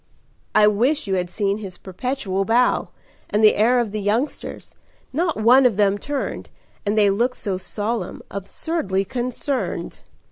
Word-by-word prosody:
"I 210 - +7
wish 245 +9 +2
you 195 - -2
had 180 -1 0
seen 200 +2 -1
his 190 -4 -8
perpetual 195 -1 -2
bow 235 +4 +2 0.4
And 210 +1 +1
the 215 - +8
air 235 +4 +3
of 235 -4 0
the 210 0 -3
youngsters! 225 +8 -2 0.4
Not 330 +3 0
one 245 +5 +6
of 240 -6 +3
them 205 -1 +3
turned, 285 +3 -4 0.4
And 210 +2 +1
they 205 -2 +5
looked 240 +5 +1
so 195 -3 -2
solemn 215 +4 -4
absurdly 195 - -2
concerned." 255 +5 -3
215 Hz, 150 wpm, -22 LUFS, 200-250 Hz, 0.4 s, the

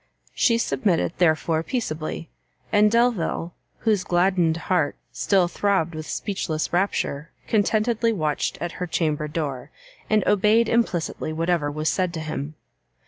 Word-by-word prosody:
She 230 -2 +3
submitted, 200 -8 0
therefore, 160 -1 +2
peaceably; 165 -7 -4 0.4
and 210 0 +5
Delvile, 220 -7 +1 0.3
whose 210 -4 +2
gladdened 175 -2 +2
heart 170 -6 +1 0.2
still 190 -3 +2
throbbed 175 -3 0
with 155 0 -6
speechless 170 -7 -3
rapture, 165 -5 0 0.2
contentedly 225 +2 +2
watched 155 -8 -1
at 175 +2 -3
her 180 - -1
chamber 155 -3 -1
door, 145 -5 -4 0.4
and 215 -1 +2
obeyed 210 +3 +4
implicitly 185 -9 0
whatever 165 -1 0
was 155 +2 -3
said 180 +1 0
to - - -3
him. 155 -1 -5
175 Hz, 130 wpm, -24 LUFS, 155-210 Hz, 0.4 s, and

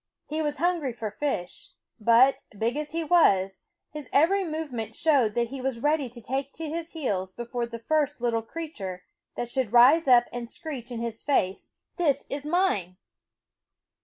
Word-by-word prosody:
He 310 +1 -3
was 295 -1 -1
hungry 335 -7 0
for 220 -2 -5
fish; 210 -8 -4 0.3
but, 235 +5 +5 0.2
big 230 +5 0
as 300 0 -3
he 330 0 -2
was, 195 - +3 0.3
his 300 -3 -8
every 385 +7 +4
movement 310 - -4
showed 270 -10 +2
that 235 -1 +1
he 275 -1 -6
was 260 -2 -2
ready 295 0 +1
to 240 +1 -12
take 265 +4 -3
to 325 0 -6
his 330 +2 -5
heels 195 - -2
before 240 +1 -4
the 235 0 -7
first 295 +4 0
little 235 -1 0
crea 320 +7 -7
ture 185 - -6 0.3
that 240 0 -4
should 255 -5 -1
rise 265 +7 +6
up 245 -2 +7
and 240 -1 -5
screech 265 -6 -7
in 235 -2 -5
his 230 -1 -4
face: 195 -10 0
" - - -46
This 305 -6 +1
is 285 +1 -4
mine 300 - +1
260 Hz, 180 wpm, -27 LUFS, 230-310 Hz, 0.3 s, up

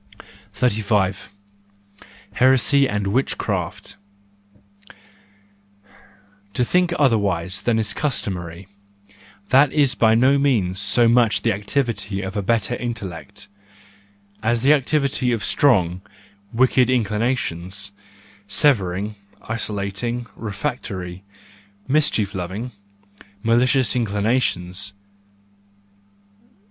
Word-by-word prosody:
35 105 -5 0 1.0
Heresy 130 +2 +4
and 105 -1 -2
Witchcraft 120 +8 -2 2.6
.—To 125 - +1
think 180 +5 +2
otherwise 100 - +1
than 120 -2 +1
is 110 -2 0
customary—that 100 - -3
is 140 -3 +2
by 110 -3 +3
no 130 +4 +4
means 105 -10 +1
so 120 +3 +3
much 115 -1 +3
the 115 - +2
activity 105 -2 -2
of 95 +2 -6
a 100 - 0
better 115 +2 0
intellect, 105 -8 -6 0.9
as 115 +2 0
the 140 +3 +6
activity 140 -3 +1
of 115 -3 -1
strong, 95 -10 +2 0.5
wicked 125 +1 +3
inclinations,—severing, 100 - -1 0.3
isolating, 110 +2 -2
refractory, 100 -5 -5 0.7
mischief 130 -8 +1
loving, 95 +6 -5 0.7
malicious 125 +3 +3
inclinations. 100 -4 -1
110 Hz, 80 wpm, -21 LUFS, 100-125 Hz, 2.6 s, the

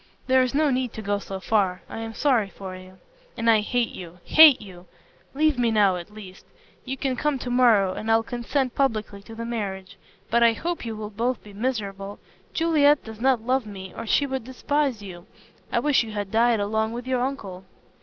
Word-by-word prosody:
"There 260 0 +4
is 255 +1 -1
no 300 -1 +3
need 255 -2 -1
to 220 - -7
go 205 0 -1
so 195 -1 -7
far. 190 -2 0
I - - -7
am 225 0 -6
sorry 245 -9 +2
for 190 -1 -8
you." 185 0 -13 0.4
"And 230 -1 -2
I 225 -1 +6
hate 235 +2 0
you 175 -1 -10
hate 310 -4 +8
you! 185 -4 -13 0.5
Leave 305 -2 +2
me 240 -1 +2
now 205 -4 +3
at 175 +2 -7
least. 195 -3 -12 0.4
You 265 +1 -4
can 265 -1 -1
come 295 +2 0
to 250 -1 -5
morrow, 225 -7 +4
and 220 - -5
I'll 225 0 +4
consent 245 +2 -2
publicly 215 -7 -1
to 225 +2 -12
the 230 +1 -5
marriage. 195 -5 -5 0.3
But 235 +1 +3
I 235 -1 +6
hope 340 +3 -4
you 225 - -4
will 215 0 -6
both 235 +3 -2
be 205 - -13
miserable. 200 -3 -4 0.3
Juliet 300 -3 +3
does 220 0 -10
not 255 -3 +2
love 255 -2 0
me 190 -2 -9
or 230 - -6
she 285 - +3
would 265 -2 -3
despise 260 -1 -1
you. 175 -3 -10 0.4
I - - 0
wish 295 -2 +3
you 225 -2 -6
had 205 -2 -4
died 230 0 +3
along 220 +2 -1
with 240 +1 -6
your 255 -1 0
uncle." 200 -9 -4
225 Hz, 210 wpm, -24 LUFS, 200-260 Hz, 0.5 s, hate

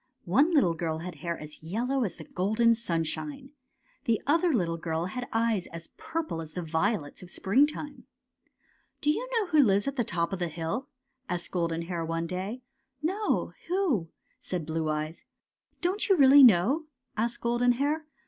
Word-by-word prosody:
One 270 - +4
little 245 - +4
girl 160 -1 -2
had 170 0 -7
hair 170 -1 -2
as 150 0 -9
yellow 240 +11 -1
as 200 - -2
the 160 - -10
golden 220 +8 +2
sunshine. 235 - -3 0.5
The 230 -3 +2
other 330 +4 +3
little 175 - 0
girl 165 0 -2
had 245 +7 -4
eyes 225 -4 +1
as 165 0 -9
purple 320 - -3
as 155 -1 -9
the 180 - -4
violets 160 0 -1
of 180 - -11
springtime. 285 - +1
*^ - - -16 1.0
Do 295 - +3
you - - -3
know 450 -3 +2
who 310 -3 +4
lives 205 -3 +3
at 275 - -2
the 240 - +2
top 170 -2 -1
of 190 - -3
this 170 -3 -2
hill? 170 - -3 0.2
" 260 -1 -45
asked 175 -1 -2
Golden 170 -2 -1
Hair 170 -1 -3
one 165 +1 -2
day. 190 +8 -4 0.2
" 265 -1 -50
No. 395 +6 0
Who? 335 - +1
" - - -42
said 175 -4 -4
Blue 160 0 -2
Eyes. 155 +2 -3 0.3
'' - - -47
Don't 380 +5 0
you 385 - +5
really 280 0 +8
know? 250 - +5
" 250 - -50
asked 230 +2 -1
Golden 240 +1 +3
Hair. 295 +5 -1
215 Hz, 190 wpm, -28 LUFS, 170-275 Hz, 1.0 s, really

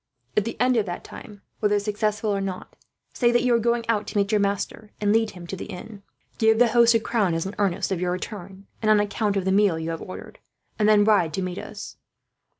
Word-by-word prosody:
"At 210 - +2
the 230 - -5
end 250 0 +3
of 210 -3 +1
that 175 - -5
time, 205 -4 -12 0.2
whether 210 -1 +2
successful 210 +1 -1
or 200 -1 -1
not, 190 -2 -6 0.4
say 240 -2 +2
that 240 0 +2
you 250 -1 +3
are 235 - +4
going 235 0 0
out 215 -2 0
to - - -4
meet 200 +1 +1
your 210 -1 +3
master 200 +2 -2
and 205 0 +2
lead 225 0 +2
him 175 - -9
to 185 - -5
the - - -7
inn. 200 +3 -9 0.4
Give 220 0 +4
the 240 0 +5
host 235 0 +5
a - - +4
crown, 210 -6 0
as 165 - -2
an 195 - -5
earnest 195 -1 0
of 180 -2 -1
your 180 0 0
return 190 +1 -7 0.2
and 215 - +1
on 215 -1 +6
account 205 0 0
of 190 - -1
the 190 - +1
meal 195 -4 +3
you 160 +1 -3
have 165 - -5
ordered, 185 - -9 0.4
and 210 0 +4
then 210 -1 +6
ride 200 -8 +3
to 190 - -2
meet 180 0 -4
us. - - -9
205 Hz, 250 wpm, -24 LUFS, 190-220 Hz, 0.4 s, on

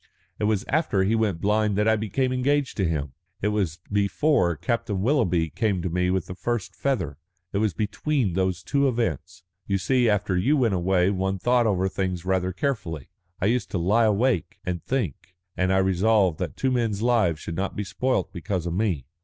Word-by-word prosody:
It - - 0
was 105 -2 +1
after 140 - +1
he 100 +4 +1
went 105 -7 0
blind 105 0 +1
that 105 +1 +2
I 110 - +5
became 120 +5 -1
engaged 140 +2 +1
to 95 -4 +1
him. 70 -4 -3 0.3
It 105 - +2
was 95 -7 -1
before 100 - +2
Captain 115 - -2
Willoughby 95 - +1
came 100 -6 0
to 90 - -2
me 90 +1 +1
with 95 0 0
the - - -7
first 120 +2 -3
feather. 90 - -2 0.3
It 100 - +1
was 105 -6 0
between 110 - -1
those 95 -1 -1
two 140 0 +2
events. 90 - -2 0.2
You 100 - +1
see, 120 +5 +2
after 105 -2 +1
you 130 +12 +2
went 120 -6 +2
away 90 +1 +2
one 95 0 -1
thought 120 +4 +2
over 95 -2 +1
things 95 -2 -3
rather 95 0 0
carefully. 90 - -3 0.3
I - - 0
used 120 +4 +1
to - - -2
lie 105 +7 +3
awake 110 - +1
and 90 -3 -3
think, 95 - -3 0.2
and 95 0 +1
I 95 - +3
resolved 95 -1 +2
that - - -4
two 130 - +1
men's 115 -4 0
lives 110 -10 +2
should 85 - -6
not 95 +2 -2
be 105 - -2
spoilt 125 +1 -1
because 90 -1 -3
of 85 - -2
me." 90 - 0
100 Hz, 195 wpm, -25 LUFS, 90-115 Hz, 0.3 s, I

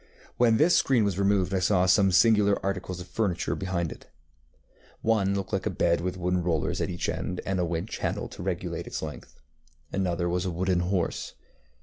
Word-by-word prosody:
When 115 -2 +4
this 165 +6 +4
screen 125 -5 +3
was 100 -2 -1
removed 100 -1 +2
I 95 - +2
saw 90 0 +3
some 95 +1 +4
singular 105 0 +4
articles 95 -2 -3
of 90 - -8
furniture 95 -5 -1
behind 90 -4 -2
it. - - -11 0.9
One 100 -3 +2
looked 100 -1 -4
like - - 0
a - - +1
bed 85 0 +1
with 90 +1 -3
wooden 90 0 0
rollers 85 -3 -1
at - - -1
each 90 -1 -3
end, 90 - -3
and 95 -1 -1
a 90 - +1
winch 85 +4 -4
handle - - -2
to - - -10
regulate - - -3
its - - -4
length. 75 -2 -8 0.5
Another 90 -2 0
was 90 +1 0
a 95 - -1
wooden 90 +1 0
horse. 90 0 -2
95 Hz, 195 wpm, -27 LUFS, 90-100 Hz, 0.9 s, When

